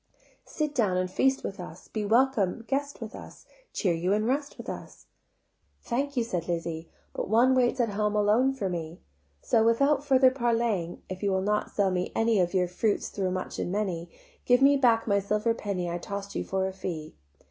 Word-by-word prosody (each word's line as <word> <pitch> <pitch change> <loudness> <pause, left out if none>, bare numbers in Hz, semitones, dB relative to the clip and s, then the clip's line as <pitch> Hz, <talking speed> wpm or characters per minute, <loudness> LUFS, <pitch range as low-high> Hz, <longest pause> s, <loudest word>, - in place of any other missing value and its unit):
Sit 300 -2 -2
down 210 -9 +1
and 185 0 -1
feast 265 +7 +2
with 195 - -5
us, 175 -1 -9
Be 215 - -3
welcome 230 -2 +2
guest 280 +1 -2
with 225 +1 -6
us, - - -11 0.3
Cheer 185 -6 0
you 175 +4 0
and 215 +1 +1
rest 280 +4 -1
with - - -9
us." - - -8 0.8
"Thank 275 +3 -2
you," 240 - +3
said 180 -7 -3
Lizzie: 165 -1 -3 0.2
"But - - -4
one 240 +4 +5
waits 255 0 +2
At 235 -2 +2
home 210 +1 -1
alone 215 +6 +3
for 205 -7 -2
me: 170 -1 -5 0.4
So 225 - +3
without 275 +5 +3
further 265 -2 +5
parleying, 230 -8 -1
If 185 0 -7
you 200 - +1
will 190 0 +1
not 210 +1 0
sell 200 -2 +1
me 180 0 -1
any 225 -2 +2
Of 180 +1 +1
your 180 -1 +3
fruits 200 +4 -1
though 190 -2 -2
much 185 0 -4
and - - -2
many, 185 -4 -2 0.3
Give 245 +2 +4
me 280 +1 +7
back 240 -4 +3
my 200 -2 +2
silver 210 +3 0
penny 200 -5 -3
I 170 0 -3
toss'd 200 +2 -6
you - - -2
for 190 0 -1
a 190 - -5
fee." 160 -5 -5
210 Hz, 200 wpm, -28 LUFS, 185-245 Hz, 0.8 s, me